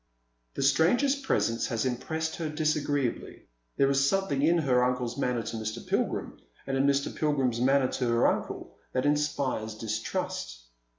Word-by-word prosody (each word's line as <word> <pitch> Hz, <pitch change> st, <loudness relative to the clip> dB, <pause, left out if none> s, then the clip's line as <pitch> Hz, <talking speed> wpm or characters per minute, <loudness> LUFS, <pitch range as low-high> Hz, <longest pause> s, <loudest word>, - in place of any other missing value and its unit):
The -, -, -1 dB
stranger's 170 Hz, -, +3 dB
presence 190 Hz, -, 0 dB
has 115 Hz, 0 st, -1 dB
impressed 160 Hz, +6 st, -2 dB
her 160 Hz, -2 st, -3 dB
disagreeably. 150 Hz, -4 st, -1 dB, 0.3 s
There 135 Hz, 0 st, +4 dB
is 135 Hz, 0 st, +3 dB
something 195 Hz, -8 st, 0 dB
in 165 Hz, +4 st, +4 dB
her 130 Hz, -6 st, +3 dB
uncle's 125 Hz, -1 st, -1 dB
manner 125 Hz, -4 st, -1 dB
to 115 Hz, -, -5 dB
Mr. 110 Hz, +1 st, -5 dB
Pilgrim, -, -, -2 dB, 0.3 s
and 135 Hz, -, -2 dB
in 135 Hz, +1 st, +2 dB
Mr. 140 Hz, 0 st, +1 dB
Pilgrim's 135 Hz, -6 st, 0 dB
manner 135 Hz, +1 st, +4 dB
to 125 Hz, -1 st, -2 dB
her 115 Hz, 0 st, +3 dB
uncle, -, -, -2 dB, 0.2 s
that 130 Hz, +1 st, 0 dB
inspires 140 Hz, -7 st, 0 dB
distrust. 110 Hz, -, -4 dB
135 Hz, 155 wpm, -28 LUFS, 120-150 Hz, 0.3 s, There